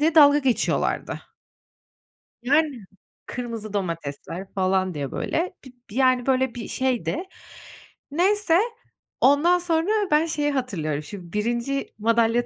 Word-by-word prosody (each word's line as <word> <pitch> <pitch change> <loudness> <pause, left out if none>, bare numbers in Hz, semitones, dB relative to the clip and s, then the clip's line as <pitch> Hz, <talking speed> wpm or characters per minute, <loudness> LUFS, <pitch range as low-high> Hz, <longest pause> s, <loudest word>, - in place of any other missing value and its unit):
diye 315 +2 +2
dalga 290 -2 +8
geçiyorlardı. 265 -5 0 1.2
Yani. 280 -5 +1 0.4
Kırmızı 230 -4 -5
domatesler 170 0 -4
falan 185 -1 +1
diye, 140 -2 -4
böyle, 355 +3 -2
bir 245 -3 -14
yani 255 -2 +3
böyle 260 -2 +2
bir 235 - -6
şeydi. 250 - -1 0.9
Neyse, 365 +2 +3 0.6
ondan 320 +6 +5
sonra 335 +1 0 0.2
ben 300 +2 +4
şeyi 295 -3 0
hatırlıyorum 165 - -2
şimdi, 175 +2 -10
1'inci 235 +6 -1
madalya 230 +2 +2
250 Hz, 110 wpm, -24 LUFS, 200-295 Hz, 1.2 s, dalga